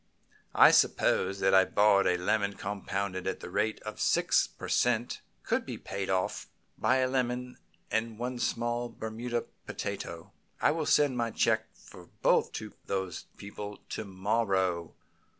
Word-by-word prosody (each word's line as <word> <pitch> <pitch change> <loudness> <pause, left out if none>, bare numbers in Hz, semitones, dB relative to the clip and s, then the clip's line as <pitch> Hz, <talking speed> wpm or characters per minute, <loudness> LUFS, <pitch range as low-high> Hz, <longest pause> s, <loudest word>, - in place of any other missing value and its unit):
"I - - +8
suppose 95 +1 +2
that 95 - +3
a 95 0 +8
borrowed 100 -3 +4
lemon 100 +2 +1
compounded 100 -2 -3
at 95 - -2
the 90 - -8
rate 105 +3 0
of 110 -1 -7
six - - +3
per - - -9
cent. 120 -1 +1 0.2
could - - 0
be - - -6
paid 100 -1 -5
off 95 -1 -1 0.3
by 125 +4 +2
a 130 0 +2
lemon 125 -1 -2 0.3
and 110 0 -1
one 125 +1 -3
small 120 +1 -1
Bermuda 115 +1 -4 0.2
potato. 85 -1 -5 0.3
I - - +4
will 155 0 -2
send 145 -4 +3
my 115 -1 0
check 110 0 +1
for - - -15 0.2
both - - +4
to 110 -1 -6
those 95 -3 -3
people 105 0 -7
to - - -4
morrow. 95 -3 0
105 Hz, 150 wpm, -30 LUFS, 95-120 Hz, 0.3 s, I